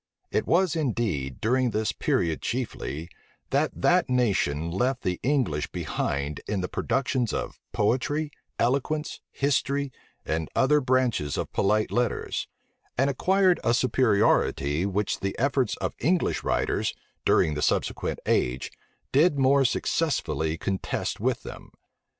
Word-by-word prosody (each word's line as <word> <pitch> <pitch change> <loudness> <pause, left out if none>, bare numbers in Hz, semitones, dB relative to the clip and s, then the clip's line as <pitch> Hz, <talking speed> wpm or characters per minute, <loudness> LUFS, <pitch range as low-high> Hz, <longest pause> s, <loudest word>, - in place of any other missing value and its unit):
It - - 0
was, 180 -1 +3
indeed, 110 - -1
during 125 +3 +2
this 110 -1 0
period 80 -2 0
chiefly, 95 - -3 0.4
that - - +2
that - - +3
nation 95 - +1
left 125 +8 0
the 90 -1 -1
English 125 - 0
behind 70 +1 -2
them - - -2
in 95 - -1
the 90 - -2
productions 130 -1 0
of - - -4
poetry, 145 +8 0 0.3
eloquence, 140 +5 0
history, 140 0 0 0.3
and 80 0 -2
other 150 +3 +4
branches 125 - +1
of - - -4
polite 105 +2 +2
letters; 120 -2 -1 0.5
and 135 +3 +3
acquired 185 +5 +3
a 120 - +3
superiority 100 - +2
which 100 +1 -1
the 95 0 -3
efforts 130 -3 +1
of - - -2
English 175 +6 +1
writers, - - 0 0.3
during 75 - +3
the 75 - -3
subsequent - - 0
age, 60 +1 0 0.4
did 145 +2 +4
more 135 +1 +4
successfully 85 - 0
contest 95 +3 -2
with - - 0
them. - - -9
120 Hz, 130 wpm, -26 LUFS, 90-140 Hz, 0.5 s, other